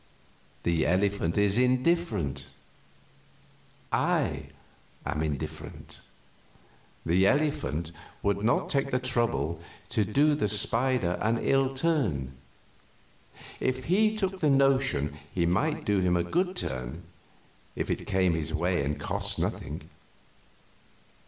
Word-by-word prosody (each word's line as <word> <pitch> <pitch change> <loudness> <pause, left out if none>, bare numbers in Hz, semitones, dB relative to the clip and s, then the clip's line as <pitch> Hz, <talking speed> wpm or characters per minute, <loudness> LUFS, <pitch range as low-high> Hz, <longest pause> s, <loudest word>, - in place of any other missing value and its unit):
The 85 -2 +2
elephant 95 -1 +1
is 105 +2 +3
indifferent; 125 - +1 1.4
I - - 0 0.6
am 75 - -2
indifferent. 75 -3 -5 1.1
The 90 +4 +4
elephant 115 - 0 0.3
would 100 0 0
not 115 - +2
take 140 -1 0
the 125 - +1
trouble 115 - 0 0.3
to 110 - +1
do 140 +9 +3
the 145 -8 0
spider 115 -2 +2
an 115 +2 +2
ill 135 +2 +1
turn; 125 - 0 1.3
if 130 0 -1
he 215 +7 +2
took 190 -2 -1
the 155 - +2
notion 135 - +2 0.2
he 85 -2 0
might 145 - 0
do 100 -1 +2
him 90 -1 +2
a 85 - +1
good 180 - 0
turn, 65 - -4 0.7
if - - -2
it - - -3
came 95 -3 +2
in 80 - 0
his 75 - -4
way 85 -1 +1
and 75 +2 -2
cost - - -1
nothing. - - -3
105 Hz, 120 wpm, -28 LUFS, 85-135 Hz, 1.4 s, The